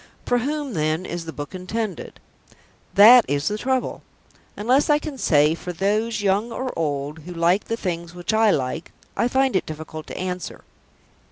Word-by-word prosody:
For 245 - +2
whom, 285 +1 -3
then, 155 +1 -1
is 175 -1 -5
the 160 - -5
book 145 +1 -7
intended? 195 +3 -5 0.8
That 230 +4 +9
is 145 +1 -1
the 210 - 0
trouble. 260 +1 -1 0.6
Unless 255 +8 +2
I 295 - +5
can 300 -3 -7
say, 150 -4 +4
"For 180 +2 -6
those, 210 +5 0
young 205 +4 +1
or 255 +2 -4
old, 145 -1 -2
who 175 +3 -9
like 170 +4 +2
the 230 - -2
things 170 -4 -4
which 175 +4 -3
I 220 0 +4
like," 135 -1 -1 0.2
I 235 - +2
find 265 -1 +1
it 190 - 0
difficult 155 0 -7
to - - -7
answer. 180 -1 -5
190 Hz, 175 wpm, -23 LUFS, 160-230 Hz, 0.8 s, That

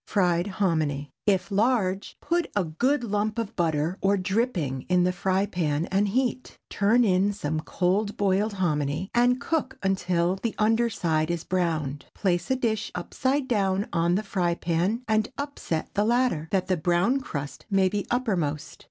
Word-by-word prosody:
FRIED 180 -3 +2
HOMINY. 155 -8 -1 0.2
If 195 0 +2
large, 200 -3 +1
put 345 0 0
a 205 - +2
good 245 - 0
lump 210 0 -1
of 230 -1 -3
butter 165 +1 0
or 200 +1 +3
dripping 185 - -1
in 180 -1 +4
the 180 - +2
frying 190 +2 0
pan, 155 -2 0
and 200 +2 +2
heat. 255 +4 -1
Turn 220 +5 +3
in 195 -1 +3
some 155 -6 -2
cold 195 +5 0
boiled 205 +2 +1
hominy, 155 -2 -1
and 245 +1 +3
cook 280 -3 -2
until 185 -2 +1
the 225 +3 -3
under 225 +2 +3
side 160 -7 0
is 170 -1 -2
browned. 160 -6 -1
Place 175 -3 0
a 260 - +3
dish 220 -4 -1
upside 260 +9 -1
down 195 -4 +1
on 170 +1 +2
the 210 - 0
frying 180 -4 0
pan 175 +9 -1
and 215 0 +1
upset 280 - -3
the 205 - +2
latter, 235 -9 +1
that 190 -2 +1
the 185 -1 0
brown 175 - +2
crust 145 - -6
may 195 -2 +3
be 200 +1 -2
uppermost. 170 - -1
190 Hz, 165 wpm, -26 LUFS, 170-220 Hz, 0.2 s, in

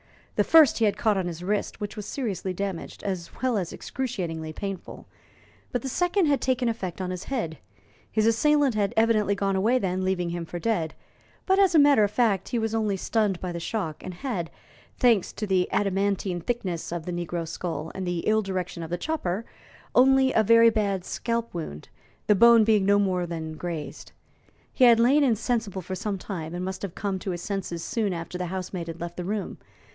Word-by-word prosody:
The - - +3
first 315 -7 +6
he 225 - +4
had 205 - +1
caught 215 -3 +2
on 180 - -2
his 170 0 -6
wrist, 205 +2 -2
which 205 0 -5
was 210 -2 -6
seriously 195 - -3
damaged, 195 -2 -5
as 185 -4 -3
well 255 -2 +2
as 175 -3 -4
excruciatingly 175 -11 -4
painful, 195 +3 -6 0.7
but 245 - -2
the 265 - -3
second 355 +6 +1
had 285 -2 +2
taken 255 -1 +1
effect 195 -7 -3
on 185 -1 -3
his 180 -1 -5
head. 195 - -3 0.5
His 215 -1 +2
assailant 280 +4 +3
had 205 -2 0
evidently 215 -3 +3
gone 195 -1 0
away 220 +7 +3
then, 185 -5 -1
leaving 180 -2 0
him 170 0 -3
for 175 - -6
dead; 175 -5 -1 0.5
but, 380 0 +3
as 380 -3 +4
a - - +8
matter 285 -6 +6
of 205 - +2
fact, 210 -4 +1
he 240 - -1
was 225 -1 -1
only 215 -3 0
stunned 205 -2 0
by 180 - -4
the 170 - -4
shock, 165 -4 -3
and 185 -1 -6
had, 180 - -3 0.5
thanks 230 -7 +3
to 215 - -4
the 190 -2 +1
adamantine 195 -2 0
thickness 185 -6 -3
of 170 -2 -4
the 180 - -3
negro 175 -1 -3
skull 165 -1 -4
and 190 -1 -4
the 175 -1 -1
ill 220 +3 +2
direction 185 -3 -4
of 165 - -6
the 175 - -2
chopper, 225 - -2 0.5
only 265 +1 +5
a 220 - +4
very 230 +2 +6
bad 200 -4 -1
scalp 235 0 -2
wound, 115 - -6 0.4
the 210 - +5
bone 230 +2 +7
being 210 -3 +3
no 205 0 +5
more 185 -3 +1
than 160 -2 -5
grazed. 165 -2 -6 0.6
He 255 - +5
had 235 -1 +7
lain 270 +6 +5
insensible 225 -5 0
for 190 - -6
some 200 +1 -3
time, 175 -4 -6
and 180 +1 -3
must 190 0 -5
have 195 -4 -5
come 195 -2 -2
to 190 - -5
his 175 -1 -4
senses 190 -5 -3
soon 215 -4 -1
after 170 +1 -5
the 180 - -2
housemaid 185 -1 -4
had 165 0 -7
left 170 0 -6
the 180 - -3
room. 205 +2 -3
195 Hz, 205 wpm, -26 LUFS, 175-230 Hz, 0.7 s, a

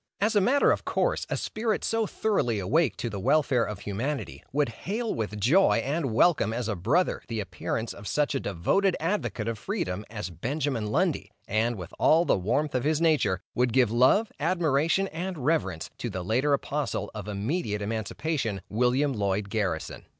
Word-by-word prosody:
As 215 +2 +1
a 205 - +5
matter 275 +8 +4
of - - 0
course, - - 0
a - - -1
spirit 220 0 -2
so 225 -1 0
thoroughly 195 - 0
awake 120 - +1
to - - -3
the 100 -3 -4
welfare 135 0 +3
of 105 -2 -5
humanity, 120 +9 -4
would 145 -1 +1
hail 215 - -3
with 105 -2 -3
joy 150 - +4
and 135 +3 -1
welcome 110 - +3
as 120 -1 -2
a 110 - -1
brother, 115 - +1
the 115 -3 -3
appearance 105 +4 -3
of 100 0 -10
such 145 +10 +1
a 135 - 0
devoted 150 - +1
advocate 165 - -2
of 115 -2 -3
freedom, 170 - -3
as 105 -4 -5
Benjamin 130 - -2
Lundy; 105 - 0 0.2
and, 115 +3 +1
with 90 -4 -8
all 165 +2 +5
the - - +3
warmth 140 +11 0
of 125 -1 0
his 155 0 +1
nature, 140 - +2
would 125 -2 +1
give 125 -4 +4
love, 130 - +4
admiration, 165 +2 +2
and 180 +2 -4
reverence 95 - 0
to 120 - -3
the 95 -3 -4
later 125 +10 +1
apostle 140 0 -1
of 105 -1 -7
immediate 105 - -2
emancipation, 110 - -2
William 125 +5 +2
Lloyd 100 -2 -1
Garrison. 95 -7 -2
125 Hz, 180 wpm, -27 LUFS, 105-160 Hz, 0.2 s, a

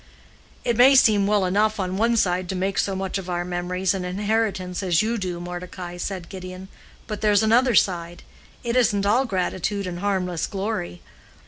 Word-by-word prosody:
"It 240 - +1
may 260 +3 +7
seem 210 -6 +5
well 205 -2 +2
enough 210 +3 +1
on 185 -1 -2
one 230 +3 +2
side 180 -3 +1
to 190 - -2
make 190 +1 -1
so 195 - 0
much 190 0 -3
of 185 -1 -8
our 175 0 -2
memories 180 +1 -1
and 190 -2 -3
inheritance 195 -1 -1
as 180 -1 +2
you 230 +2 0
do, 180 -3 -3
Mordecai," 175 0 -7
said 180 -1 -5
Gideon; 185 0 -9 0.4
"but 210 -1 -6
there's 210 0 +3
another 235 +2 +4
side. 175 -3 +1 0.4
It 235 0 -2
isn't 210 -5 +2
all 235 +6 +3
gratitude 195 -1 -2
and 175 -1 -5
harmless 180 -4 -1
glory. 190 - -4
190 Hz, 180 wpm, -23 LUFS, 180-210 Hz, 0.4 s, may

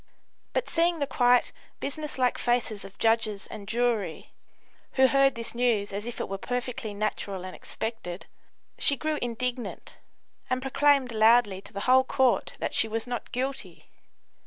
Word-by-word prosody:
But - - 0
seeing 340 +1 +2
the 290 - 0
quiet, 245 -2 +3 0.3
business 300 +1 -4
like 250 -1 +1
faces 240 -4 0
of 195 - -12
judges 220 -3 +2
and 200 -2 -9
jury, 225 -7 -1 0.6
who 265 - +5
heard 275 0 +4
this 230 0 -4
news 235 -5 +1
as 205 +3 -3
if 240 - -5
it - - -2
were 195 0 -4
perfectly 245 -1 -3
natural 200 -2 -3
and 185 - -7
expected, 210 -5 -5 0.5
she 280 - +3
grew 310 +1 -1
indignant, 245 +1 -4 0.5
and 255 - +1
proclaimed 270 -1 +3
loudly 220 -3 +4
to - - -11
the 200 - -5
whole 260 +3 +5
Court 260 -2 +2
that - - -3
she 225 - +3
was 225 +1 -2
not 245 -1 -5
guilty. 265 +2 -4
240 Hz, 160 wpm, -27 LUFS, 215-260 Hz, 0.6 s, who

